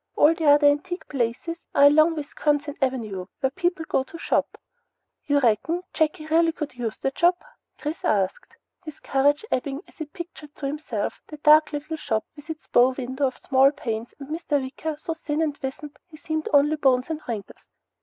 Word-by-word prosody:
All 305 +2 +6
the 325 -1 -3
other 290 0 +6
antique 300 +6 +1
places 270 +6 -2 0.2
are 280 - +5
along 310 +3 +6
Wisconsin 290 -1 -1
Avenue 220 -9 -2
where 265 -1 +1
people 350 0 -1
go - - +1
to 335 - -10
shop." - - -1 0.7
"You 285 -1 +3
reckon 280 - +1
Jakey 310 -1 0
really 330 +1 +3
could 300 -4 -5
use 240 -3 -4
the 270 - -1
job?" 345 +5 +3 0.4
Chris 300 +2 -5
asked, 195 -2 -1 0.3
his 310 -2 -9
courage 285 +6 +2
ebbing 275 +3 -1
as - - -22
he 315 - -3
pictured 315 -2 -10
to 280 - -6
himself 275 -7 -3
the 305 - -9
dark 300 +1 +6
little 305 +2 -4
shop 220 -8 -1
with 295 +1 -14
its 320 0 -6
bow 250 +2 +4
window 265 +1 -1
of 255 - -6
small 270 0 +4
panes, 230 -5 -5
and 275 -1 -10
Mr. 310 -2 -1
Wicker, 285 +4 -4
so 330 +2 -4
thin 310 -1 -3
and 305 -3 -1
wizened 280 +2 -6
he 320 -3 -14
seemed 315 0 -3
only 295 +2 +4
bones 260 0 +2
and 310 -1 -3
wrinkles. 220 -4 -7
290 Hz, 185 wpm, -24 LUFS, 265-315 Hz, 0.7 s, All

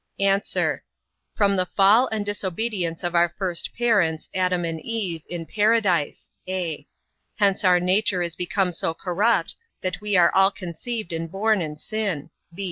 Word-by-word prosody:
A. 195 0 +3 0.9
From 200 -1 +3
the 185 - +2
fall 205 +7 +4
and 215 -2 -3
disobedience 195 -3 -2
of 175 0 -2
our 170 0 +4
first 180 -4 -2
parents, 200 -10 +1
Adam 180 -2 0
and 165 -1 -4
Eve, 200 -8 -3
in 170 -2 -4
Paradise; 205 -7 +1 0.2
(a) 170 -6 -3 0.5
hence 200 -2 +2
our 180 -2 +5
nature 185 +1 +2
is 170 -1 -4
become 180 +1 0
so 165 -1 -2
corrupt, 200 +7 +1 0.3
that 185 +1 -3
we 210 -2 +1
are 175 - +5
all 195 0 +5
conceived 200 +2 -6
and 165 0 -4
born 210 +1 +1
in 150 -2 -5
sin. 190 -6 -3
185 Hz, 150 wpm, -24 LUFS, 170-205 Hz, 0.9 s, our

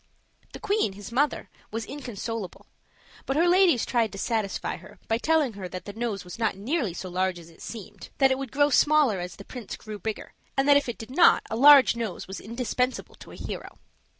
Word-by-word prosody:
The - - -8
queen, 415 - 0
his 205 +2 -10
mother, 285 +5 0 0.2
was 225 0 -4
inconsolable; 230 -7 -6 0.6
but 270 - 0
her 340 +2 +4
ladies 355 - +4
tried 230 -3 +1
to - - -7
satisfy 215 -1 -2
her - - -15
by 225 +1 +1
telling 310 -4 +2
her 190 -3 -7
that 185 +1 -7
the 205 - -7
nose 220 -3 -3
was 180 +4 -10
not 225 -4 +1
nearly 220 - -2
so 185 - -6
large 185 0 -1
as 170 -1 -13
it 165 - -19
seemed, 210 -3 -9
that 270 -1 +4
it 260 - 0
would 270 -3 -5
grow 290 +1 +3
smaller 290 -7 +4
as 175 -1 -6
the 200 - -12
prince 245 -6 -7
grew 215 -1 -8
bigger, 220 +2 -5 0.2
and 270 +1 +2
that 285 - +7
if 285 -3 +2
it 235 - -4
did 225 +2 -9
not 340 +6 +5
a - - -1
large 275 +1 +8
nose 225 -6 -4
was 190 - -6
indispensable 250 +3 -2
to - - -14
a - - -11
hero. - - -7
230 Hz, 215 wpm, -26 LUFS, 200-275 Hz, 0.6 s, large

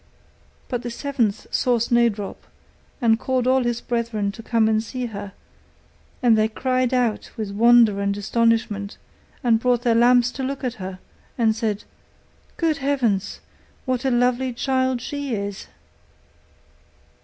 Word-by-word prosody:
But 245 -2 -3
the 240 - -5
seventh 240 -4 -1
saw 245 -1 +2
Snowdrop, 235 -3 0 0.6
and 225 -1 +4
called 260 -1 0
all 260 +1 +3
his 240 -1 -1
brethren 230 -4 -2
to 225 - -10
come 225 -1 +2
and 220 0 +2
see 250 +2 -5
her; 205 -3 -7 0.9
and 235 -2 +5
they 215 0 +3
cried 255 +2 0
out 245 -4 0
with 215 -3 -4
wonder 230 -1 +5
and 200 0 -1
astonishment 215 -1 0 0.5
and 230 -3 +3
brought 245 0 +1
their 235 -3 +3
lamps 245 +1 +4
to 265 - -5
look 275 +1 -4
at 250 -2 -1
her, 185 0 -6 0.4
and 225 -3 +2
said, 220 -3 -2 0.7
'Good 320 -3 +1
heavens! 245 -8 -1 0.4
what 255 0 -1
a 265 - +1
lovely 250 +1 +1
child 260 0 0
she 285 -2 -3
is! 200 -1 -5
235 Hz, 145 wpm, -22 LUFS, 220-255 Hz, 0.9 s, and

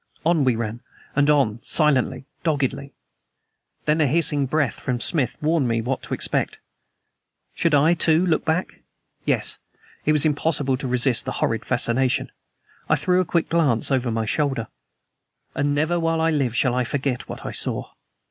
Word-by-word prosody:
On 165 -3 +3
we 130 -3 +2
ran, 115 +1 -4 0.3
and 145 +1 +3
on 130 -7 +2
silently, 145 -3 +1 0.2
doggedly. 140 -3 -2 0.9
Then 155 +1 +2
a 150 - +3
hissing 145 -1 +2
breath 145 -4 -1
from 125 -2 -2
Smith 140 0 +2
warned 155 -3 +2
me 115 -1 0
what 125 +3 -2
to - - -4
expect. - - 0 1.0
Should 165 -3 +1
I, 150 +4 +4
too, 165 +1 +2
look 165 -4 +1
back? 160 +3 -2 0.4
Yes. - - +2 0.4
It 155 - +2
was 150 -1 +2
impossible 145 -3 0
to 130 - -4
resist 125 0 +2
the - - -3
horrid 115 - -1
fascination. 130 +2 +1 0.6
I - - +5
threw 180 0 +2
a - - -2
quick 170 -1 0
glance 145 -8 +2
over 130 -2 +1
my 115 -1 -1
shoulder. 135 -2 -1 0.8
And 145 0 0
never 160 +4 +1
while 165 0 0
I 165 0 +2
live 135 -6 0
shall 120 0 +2
I 125 0 +1
forget 130 0 -3
what - - -8
I - - -4
saw. - - -1
140 Hz, 165 wpm, -22 LUFS, 125-160 Hz, 1.0 s, I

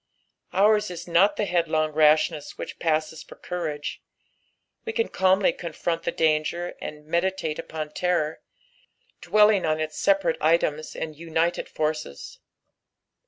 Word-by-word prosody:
Dura 205 +4 +5
is 180 -5 -5
not 190 +4 +4
the 210 - -1
headlong 160 -4 +1
rashness 155 0 +2
which - - -7
paaoeo 160 -1 -1
for - - -12
courage, 155 -5 -5 0.8
we 450 -1 -5
ess 455 - +1
calmly 190 +1 +3
confront 165 0 -3
the - - -2
danger, 160 +2 0
and 150 0 -7
meditate 170 -1 -1
upon 155 -1 -5
terror, 165 -2 -1 0.8
dwelling 210 -2 +4
on 155 0 0
ita 155 0 -3
separate 195 -3 +2
items 155 -1 +1
and 155 -1 -5
united 165 +2 -1
forces. 155 - -4
165 Hz, 125 wpm, -25 LUFS, 155-180 Hz, 0.8 s, Dura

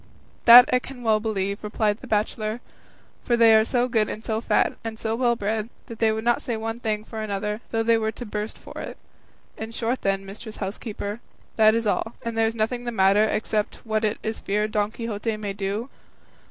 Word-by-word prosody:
"That 245 +1 +11
I 250 - +5
can 250 -1 -10
well 220 -2 +3
believe," 200 -2 -2
replied 210 0 0
the - - -11
bachelor, 215 +1 -1 0.6
"for 240 - +1
they 230 -1 +7
are 220 0 +6
so 245 +2 +1
good 220 -3 +1
and 220 - -6
so 220 0 -1
fat, - - +2
and 225 -1 -5
so 220 0 -2
well 240 0 +2
bred, 215 +1 -2 0.2
that 230 - -10
they 225 -1 +3
would 220 0 -3
not 240 0 +2
say 235 -3 -3
one 225 +1 -4
thing 215 -3 -2
for 220 0 -7
another, 210 +1 -3
though 225 0 0
they 230 0 +3
were 220 0 -1
to 245 - -7
burst 210 0 -4
for - - -10
it. - - -7 0.6
In 220 +1 -6
short 235 +2 -2
then, 195 0 0
mistress 215 +3 -8
housekeeper, 205 +1 -5 0.4
that 220 0 +5
is 230 0 0
all, 225 +2 -1
and 230 -1 -3
there 225 0 +3
is 225 - -3
nothing 240 +2 -1
the 240 - -2
matter, 200 0 +4
except 215 -1 -1
what 220 -1 0
it 215 0 0
is 220 0 -3
feared 210 +2 -1
Don 210 -1 +1
Quixote 225 -1 -3
may 205 -2 -4
do?" 200 +4 -3
220 Hz, 215 wpm, -24 LUFS, 210-230 Hz, 0.6 s, That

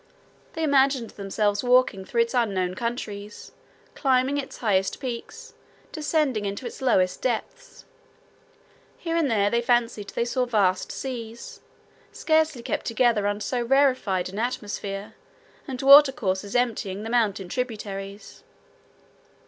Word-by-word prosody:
They 320 - -3
imagined 270 -5 +2
themselves 205 +1 -1
walking 250 -6 +3
through 235 +4 +1
its 230 0 -1
unknown 195 -7 0
countries, 210 -2 -5 0.4
climbing 265 +1 +1
its 270 - -7
highest 195 -4 0
peaks, 240 -3 -7 0.4
descending 300 -7 0
into 200 +4 -4
its 240 - -7
lowest 185 -8 +2
depths. 255 - -4 1.1
Here 330 -1 -3
and 325 -4 +2
there 205 -3 +2
they 235 - +2
fancied 235 -4 0
they 235 - -1
saw 250 +1 0
vast 195 -5 +1
seas, 235 -3 -7 0.5
scarcely 315 -5 +1
kept - - -3
together 230 -3 +2
under 205 +1 -2
so 250 -2 -1
rarefied 255 -8 +2
an 195 +3 -6
atmosphere, 205 -4 -4 0.5
and 260 -2 -5
water 280 +1 +9
courses 200 -4 -3
emptying 215 -5 -1
the 225 - -5
mountain 205 -6 +1
tributaries. 205 -3 -6
235 Hz, 125 wpm, -25 LUFS, 205-255 Hz, 1.1 s, water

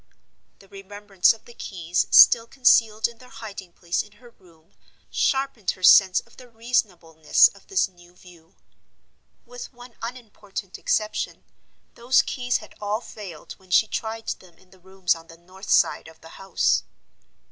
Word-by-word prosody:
The 195 - -20
remembrance 195 -1 0
of 225 - -10
the 240 - -15
keys 175 -5 -3
still 230 -1 +7
concealed 225 -4 +3
in 235 -1 -16
their 250 - -16
hiding 205 -5 -10
place 170 0 -3
in 210 - -15
her 235 +3 -18
room 165 -6 -25 0.4
sharpened 270 -7 -1
her 185 - -17
sense 190 0 +6
of 235 - -24
the 250 -1 -15
reasonableness 190 -9 +1
of - - -21
this 390 - +1
new 175 -1 -21
view. 175 -2 -19 0.9
With 245 0 -10
one 245 -1 -15
unimportant 215 -5 -8
exception, 215 0 -2 0.5
those 245 +2 +2
keys 245 -2 -2
had - - -14
all 210 +2 -2
failed 190 -10 -11
when 190 -1 -23
she 180 - +4
tried 225 +1 -5
them 175 -3 -8
in 185 - -26
the 190 - -20
rooms 190 -1 -1
on 165 0 -13
the 165 - -15
north 185 +3 -14
side - - +2
of 160 0 -16
the 165 - -14
house. 195 +3 0
205 Hz, 160 wpm, -23 LUFS, 180-230 Hz, 0.9 s, still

